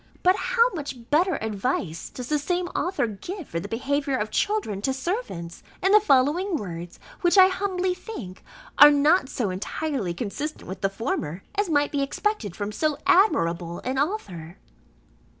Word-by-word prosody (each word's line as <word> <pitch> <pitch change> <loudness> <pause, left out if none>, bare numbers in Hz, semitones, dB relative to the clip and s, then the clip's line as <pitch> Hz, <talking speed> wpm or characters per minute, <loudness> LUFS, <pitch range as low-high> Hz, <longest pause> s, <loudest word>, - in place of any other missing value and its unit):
But 365 +1 +5
how 470 +2 +3
much 270 -6 -7
better 345 +4 +3
advice 200 - -2
does 250 -1 -7
the 300 +1 +1
same 355 +4 -1
author 360 -7 -1
give 310 - -7
for 170 - -2
the 190 - -6
behaviour 270 +4 -1
of 215 -2 -3
children 405 - -1
to 265 +5 0
servants 265 - -4 0.2
in 385 - +4
the 425 - +8
following 325 +3 +2
words 175 - -6 0.2
which, 350 +2 +3
I 375 0 +9
humbly 370 -1 -1
think, 255 - -8 0.4
are 295 - +11
not 295 +1 +3
so 215 -7 -2
entirely 210 - -3
consistent 265 - -5
with 190 +1 -7
the 195 - +2
former, 195 - -3
as 410 -2 0
might 290 -2 +2
be 285 - 0
expected 275 - -2
from 205 0 -4
so 300 +6 0
admirable 175 - +3
an 260 +1 -2
author. 190 - -3
280 Hz, 165 wpm, -25 LUFS, -, 0.4 s, are